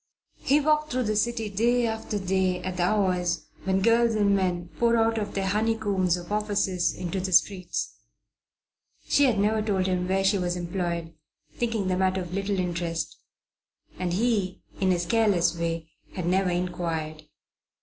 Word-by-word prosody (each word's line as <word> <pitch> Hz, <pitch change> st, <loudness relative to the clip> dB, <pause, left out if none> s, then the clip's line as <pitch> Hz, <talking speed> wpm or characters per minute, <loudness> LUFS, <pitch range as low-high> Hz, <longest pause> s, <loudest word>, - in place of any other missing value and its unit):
He 285 Hz, +2 st, +3 dB
walked 305 Hz, +1 st, +2 dB
through 255 Hz, 0 st, 0 dB
the 215 Hz, -1 st, -1 dB
city 225 Hz, +1 st, 0 dB
day 235 Hz, +4 st, +2 dB
after 220 Hz, -1 st, -3 dB
day 190 Hz, -1 st, 0 dB
at 185 Hz, 0 st, -4 dB
the -, -, 0 dB
hours 180 Hz, -4 st, +1 dB, 0.2 s
when 190 Hz, 0 st, +1 dB
girls 230 Hz, 0 st, +4 dB
and 200 Hz, -2 st, +3 dB
men 180 Hz, -3 st, -1 dB
pour 235 Hz, 0 st, +3 dB
out 225 Hz, 0 st, +2 dB
of 205 Hz, -1 st, -5 dB
their 195 Hz, -1 st, 0 dB
honeycombs 205 Hz, -3 st, +1 dB
of 175 Hz, +2 st, -9 dB
offices 205 Hz, -4 st, 0 dB
into 180 Hz, +1 st, -4 dB
the 185 Hz, +1 st, -3 dB
streets. 185 Hz, 0 st, +1 dB, 1.1 s
She 285 Hz, -, +4 dB
had 245 Hz, -5 st, +2 dB
never 215 Hz, +2 st, +2 dB
told 200 Hz, -3 st, 0 dB
him 180 Hz, -1 st, 0 dB
where 190 Hz, +1 st, +1 dB
she 195 Hz, +1 st, +3 dB
was 175 Hz, -1 st, -1 dB
employed, 170 Hz, -2 st, -3 dB, 0.4 s
thinking 230 Hz, -5 st, -1 dB
the 185 Hz, -1 st, 0 dB
matter 190 Hz, 0 st, +1 dB
of 175 Hz, -1 st, -7 dB
little 195 Hz, +1 st, -1 dB
interest; 170 Hz, -3 st, -2 dB, 0.8 s
and 180 Hz, -1 st, -1 dB
he, 205 Hz, -3 st, 0 dB, 0.2 s
in 190 Hz, -, +2 dB
his 175 Hz, -1 st, +1 dB
careless 200 Hz, -5 st, +2 dB
way, 165 Hz, -1 st, -3 dB, 0.2 s
had 180 Hz, -, -4 dB
never 185 Hz, +1 st, +2 dB
inquired. 165 Hz, -3 st, -3 dB
190 Hz, 165 wpm, -26 LUFS, 180-215 Hz, 1.1 s, girls